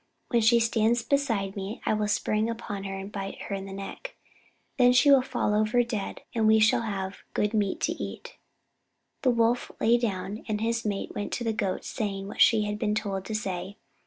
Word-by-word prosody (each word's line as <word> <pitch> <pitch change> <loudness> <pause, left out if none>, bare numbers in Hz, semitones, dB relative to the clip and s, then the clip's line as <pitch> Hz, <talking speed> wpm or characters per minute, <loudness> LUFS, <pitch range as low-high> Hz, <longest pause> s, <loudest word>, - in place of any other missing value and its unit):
When 235 -2 +3
she 235 +2 +5
stands 230 +1 +2
beside 225 -8 0
me 200 +3 -5
I - - +2
will 210 -1 0
spring 215 +1 0
upon 205 -4 -5
her 195 0 -4
and 195 +1 -7
bite 195 -1 -5
her - - -5
in 195 0 -4
the - - -8
neck. 195 - -7 0.6
Then 245 0 +6
she 285 +3 +6
will 275 -2 +7
fall 230 -4 -1
over 215 +3 +3
dead, 225 -4 -4
and 225 -2 +2
we 220 0 +6
shall 215 +1 +4
have 195 -3 -4
good 210 +1 +1
meat 205 -3 0
to - - +1
eat." - - -7 0.9
The 260 - +3
Wolf 235 0 +2
then - - 0
lay 235 +1 +6
down, 205 -2 -3
and 215 -2 -1
his 230 +1 0
mate 200 -2 -2
went 205 - -4
to 240 - -2
the 225 -1 0
Goat, 200 -3 -2
saying 195 -4 -3
what 205 - -4
she 220 -2 +6
had 210 0 -3
been 210 -1 0
told 195 -3 -2
to 220 - -4
say. 190 -1 -4
215 Hz, 215 wpm, -27 LUFS, 200-230 Hz, 0.9 s, will